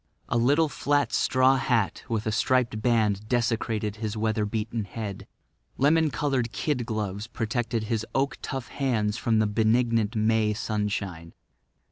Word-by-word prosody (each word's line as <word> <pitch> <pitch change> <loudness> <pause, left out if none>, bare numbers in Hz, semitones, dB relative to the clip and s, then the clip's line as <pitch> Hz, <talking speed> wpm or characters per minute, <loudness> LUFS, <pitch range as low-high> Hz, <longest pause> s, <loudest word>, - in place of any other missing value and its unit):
A - - +1
little 145 +7 +3
flat 145 0 0
straw 130 +1 +3
hat 120 -6 0
with 115 -1 -1
a 110 - 0
striped 115 -1 +1
band 110 -3 +1
desecrated 115 -3 0
his 110 0 -4
weather 110 -1 0
beaten 110 0 -3
head. 100 0 -6 0.5
Lemon 155 +3 +4
coloured 135 -5 -1
kid 125 -4 -2
gloves 105 -1 -3
protected 115 -1 -2
his 110 0 -1
oak 135 +1 0
tough 135 -2 -5
hands 115 -6 0
from 115 -2 +1
the 110 - +3
benignant 115 +1 +2
May 110 0 +2
sunshine. 100 -6 -3
115 Hz, 140 wpm, -26 LUFS, 105-125 Hz, 0.5 s, Lemon